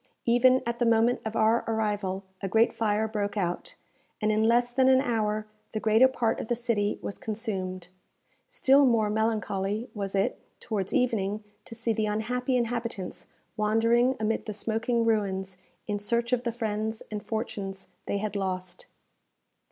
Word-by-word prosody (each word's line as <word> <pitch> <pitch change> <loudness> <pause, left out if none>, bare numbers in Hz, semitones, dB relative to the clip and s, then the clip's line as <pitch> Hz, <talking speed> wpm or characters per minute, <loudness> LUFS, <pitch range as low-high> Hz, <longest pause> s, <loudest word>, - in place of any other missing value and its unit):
Even 255 +2 +5
at 235 0 -2
the 240 - +2
moment 230 +2 +3
of 220 0 -4
our 220 +1 +3
arrival 205 -4 -1 0.2
a 195 - -2
great 225 +4 +3
fire 215 0 +1
broke 210 -1 -2
out, 190 - -2 0.4
and 215 -1 +1
in 215 0 +2
less 240 +2 +3
than 260 +1 +4
an 260 0 +6
hour 215 -4 0 0.3
the 215 - -1
greater 220 +4 +5
part 245 -3 0
of - - -5
the 240 - +1
city 230 -4 0
was 200 - -5
consumed. 190 -5 -4 0.6
Still 285 - +4
more 220 -3 +2
melancholy 215 0 -1
was 200 -2 -3
it, 195 - 0 0.2
towards 195 -4 -3
evening, 215 -4 0 0.2
to 230 - -9
see 230 0 0
the 215 -1 0
unhappy 250 +5 0
inhabitants 230 -5 -3 0.3
wandering 230 +4 +3
amid 220 +1 -1
the 215 - -3
smoking 225 +3 0
ruins 190 -4 0 0.3
in 205 -1 -2
search 235 +4 0
of 250 0 +1
the 235 - +1
friends 220 -1 -3
and 210 -1 -4
fortunes 195 -4 -4 0.2
they - - 0
had 210 0 -3
lost. 185 -2 -4
220 Hz, 160 wpm, -28 LUFS, 205-235 Hz, 0.6 s, an